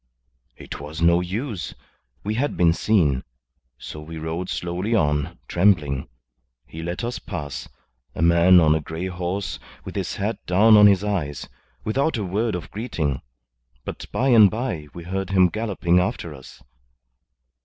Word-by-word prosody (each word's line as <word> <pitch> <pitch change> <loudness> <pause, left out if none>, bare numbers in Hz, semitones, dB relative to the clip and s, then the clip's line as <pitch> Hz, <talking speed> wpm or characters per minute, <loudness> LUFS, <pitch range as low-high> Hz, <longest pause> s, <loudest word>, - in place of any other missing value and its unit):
It - - -8
was 75 +3 -7
no 85 +1 +4
use. 100 - -4 0.5
We 105 - -1
had 135 +6 -1
been 85 -2 +4
seen. 80 -10 +2 0.5
So 75 - -8
we 80 +1 -8
rode 80 +3 -4
slowly 90 +6 -2
on, 75 -2 0
trembling. 75 -9 +2 0.6
He 80 - -9
let 85 +6 -4
us 120 +1 -3
pass 70 - -6 0.5
a 80 - -1
man 85 +2 +6
on 80 -2 +5
a 80 - +1
grey 80 +4 -5
horse 95 +1 -3 0.3
with - - -8
his - - -2
hat 105 +1 -3
down 105 +5 +6
on 105 0 +9
his 100 -1 +4
eyes 75 -11 -2 0.4
without 135 +6 0
a 105 - -2
word 105 +4 -1
of 90 - -7
greeting; 85 - -2 0.6
but - - -6
by 135 - +1
and 110 -5 +8
by 90 - -3
we 85 - -7
heard 95 +2 -3
him 95 -2 +4
galloping 95 -4 +1
after 90 -4 -2
us. 65 -2 -14
90 Hz, 155 wpm, -23 LUFS, 80-105 Hz, 0.6 s, on